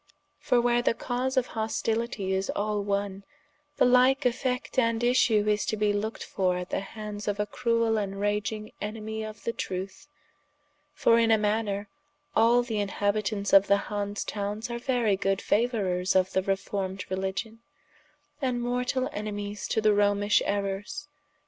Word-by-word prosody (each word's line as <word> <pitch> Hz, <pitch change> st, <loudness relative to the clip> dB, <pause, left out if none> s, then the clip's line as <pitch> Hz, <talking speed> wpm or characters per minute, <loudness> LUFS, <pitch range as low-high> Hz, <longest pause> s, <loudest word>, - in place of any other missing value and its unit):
For 245 Hz, -, +2 dB
where 240 Hz, 0 st, +3 dB
the 230 Hz, -, +1 dB
cause 255 Hz, +3 st, -2 dB
of 255 Hz, -, +2 dB
hostilitie 220 Hz, -2 st, -1 dB
is 190 Hz, +1 st, -1 dB
all 210 Hz, 0 st, 0 dB
one, 200 Hz, -1 st, -2 dB, 0.5 s
the -, -, +5 dB
like 255 Hz, +2 st, +4 dB
effect 250 Hz, +1 st, 0 dB
and 230 Hz, -1 st, +1 dB
issue 230 Hz, -4 st, +3 dB
is 210 Hz, 0 st, +2 dB
to 215 Hz, -, -1 dB
be 210 Hz, 0 st, +2 dB
looked 215 Hz, +2 st, -3 dB
for 185 Hz, -2 st, 0 dB
at 180 Hz, 0 st, -6 dB
the -, -, 0 dB
hands 210 Hz, +1 st, -7 dB
of 205 Hz, 0 st, -1 dB
a 210 Hz, -, +1 dB
cruell 230 Hz, -1 st, +1 dB
and 195 Hz, -1 st, -4 dB
raging 210 Hz, +1 st, -2 dB
enemie 220 Hz, +1 st, -4 dB
of 215 Hz, 0 st, -8 dB
the 230 Hz, -, -1 dB
trueth: 190 Hz, +7 st, -5 dB, 0.8 s
for 230 Hz, -5 st, +4 dB
in 230 Hz, -1 st, +3 dB
a 220 Hz, -, +6 dB
maner, 210 Hz, -1 st, -1 dB, 0.5 s
all 235 Hz, +2 st, +5 dB
the 225 Hz, -3 st, -2 dB
inhabitants 205 Hz, 0 st, -1 dB
of 195 Hz, 0 st, +7 dB
the 200 Hz, -, +5 dB
Hanse 205 Hz, 0 st, -2 dB
Townes 210 Hz, +3 st, -3 dB
are 235 Hz, -, -3 dB
very 240 Hz, -5 st, +1 dB
good 195 Hz, 0 st, 0 dB
fauourers 195 Hz, -6 st, +1 dB
of 185 Hz, 0 st, +3 dB
the 190 Hz, -, +1 dB
reformed 195 Hz, 0 st, -2 dB
Religion, 195 Hz, +4 st, -3 dB, 0.8 s
and 255 Hz, -3 st, 0 dB
mortall 250 Hz, +2 st, -1 dB
enemies 205 Hz, 0 st, -4 dB
to 220 Hz, -, 0 dB
the 215 Hz, -1 st, +4 dB
Romish 205 Hz, 0 st, +3 dB
errors. 200 Hz, 0 st, -3 dB
210 Hz, 160 wpm, -27 LUFS, 200-230 Hz, 0.8 s, of